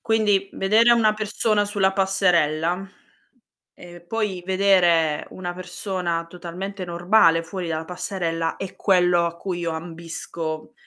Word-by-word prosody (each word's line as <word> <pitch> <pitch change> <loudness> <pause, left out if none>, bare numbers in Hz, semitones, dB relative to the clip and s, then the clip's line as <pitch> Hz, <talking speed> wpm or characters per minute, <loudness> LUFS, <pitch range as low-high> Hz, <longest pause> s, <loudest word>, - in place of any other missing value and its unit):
Quindi, 210 -3 +1
vedere 220 +5 +4
una 225 -2 +4
persona 215 0 0
sulla 200 -2 +1
passerella, 180 -2 +1 0.9
e 175 0 -13
poi 195 0 -3
vedere 180 -5 +3
una 175 -1 -6
persona 180 -2 -3
totalmente 180 +3 -7
normale 175 -1 +3
fuori 175 +1 -6
dalla 160 0 -3
passerella, 165 -2 -3
è 195 -1 -7
quello 180 -3 +3
a 170 0 -5
cui 175 0 -4
io 170 - -2
ambisco, 165 -1 -6
180 Hz, 120 wpm, -23 LUFS, 170-195 Hz, 0.9 s, vedere